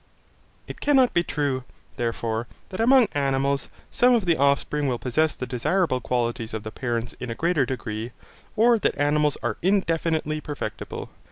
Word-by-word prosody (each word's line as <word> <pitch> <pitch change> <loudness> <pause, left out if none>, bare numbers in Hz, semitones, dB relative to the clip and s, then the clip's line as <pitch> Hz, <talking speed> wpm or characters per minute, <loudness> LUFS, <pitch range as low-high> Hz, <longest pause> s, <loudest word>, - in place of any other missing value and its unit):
It - - -9
cannot 270 -4 +4
be 170 - +3
true, 140 -6 -1 0.3
therefore, 115 -1 -2 0.2
that 185 - -7
among 245 +1 +6
animals, 140 -1 0 0.2
some 250 0 +4
of 220 -5 0
the 170 -2 +3
offspring 140 +1 +1
will 125 -2 0
possess 140 +6 0
the 125 - -4
desirable 130 +3 0
qualities 120 -2 -2
of 110 - -5
the 110 - -6
parents 120 -1 -3
in 125 - -5
a 115 - -3
greater 165 -4 +1
degree, 110 -3 -4 0.5
or 230 +1 +5
that - - 0
animals 150 0 +2
are 120 -3 -1
indefinitely 165 -5 +1
perfectible. 145 -7 -6
140 Hz, 160 wpm, -25 LUFS, 120-170 Hz, 0.5 s, among